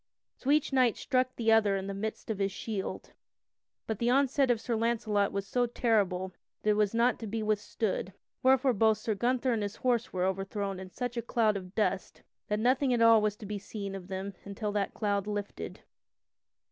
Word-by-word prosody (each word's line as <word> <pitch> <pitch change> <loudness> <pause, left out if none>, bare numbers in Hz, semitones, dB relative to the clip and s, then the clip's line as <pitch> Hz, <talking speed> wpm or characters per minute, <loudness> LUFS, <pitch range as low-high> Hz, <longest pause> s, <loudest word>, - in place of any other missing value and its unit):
So 265 - -5
each 295 -1 +3
knight 255 -4 +3
struck 255 -1 0
the 225 -1 +2
other 210 -3 +4
in 190 0 -3
the 200 - -4
midst 215 +3 -4
of 205 - -4
his 195 0 +1
shield, 200 -1 -5 0.7
but 220 -2 -3
the 235 - +1
onset 270 +1 +3
of 240 -2 +3
Sir 235 0 -2
Launcelot 220 -3 +1
was 200 0 -3
so 245 +4 +1
terrible 195 -6 +1 0.3
that 215 - +3
it - - +4
was 210 +1 +1
not 240 +2 +3
to 225 - -5
be 220 +1 -2
withstood, 210 -2 -1 0.3
wherefore 260 0 +4
both 220 0 +3
Sir 215 +1 -2
Gunther 245 +4 +1
and 220 - -1
his 205 +1 -3
horse 245 -2 0
were 180 0 0
overthrown 195 +1 -2
in 190 0 -8
such 245 +4 -4
a - - +1
cloud 225 -2 +1
of 185 -1 -7
dust 195 -3 -1 0.2
that 210 - 0
nothing 255 +3 +2
at 235 - 0
all 230 -1 +7
was 210 -1 0
to 210 - -10
be 205 0 -4
seen 200 -1 -6
of 190 -2 -7
them 190 +1 -4
until 200 +1 -4
that 205 -1 -1
cloud 205 -2 0
lifted. 205 -1 -5
215 Hz, 205 wpm, -30 LUFS, 200-235 Hz, 0.7 s, all